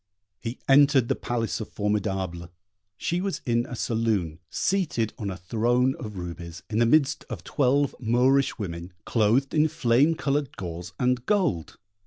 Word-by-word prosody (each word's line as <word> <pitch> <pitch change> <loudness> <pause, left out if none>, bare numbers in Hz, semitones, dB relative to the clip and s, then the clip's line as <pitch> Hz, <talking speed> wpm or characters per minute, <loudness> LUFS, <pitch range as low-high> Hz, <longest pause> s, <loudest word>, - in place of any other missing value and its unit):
He 115 +2 -5
entered 140 -3 +5
the - - +2
palace 115 -7 -2
of 110 - -6
Formidable: 95 -4 -2 0.5
she 175 - -1
was 195 0 -2
in 120 0 +1
a 125 - -6
saloon, 110 -9 -1
seated 155 - 0
on 100 - -3
a 90 - -5
throne 120 +7 +1
of 105 -4 -7
rubies, 85 -1 -7
in 110 - +1
the 120 - +4
midst 145 +2 +3
of 105 -9 -6
twelve 140 - +1
Moorish 130 +3 +2
women, 90 -4 -6
clothed 115 +5 +2
in 155 0 +4
flame 145 0 +3
coloured 140 -3 -1
gauze 90 0 -6
and 125 -1 +1
gold. 180 - 0
115 Hz, 155 wpm, -26 LUFS, 95-135 Hz, 0.5 s, entered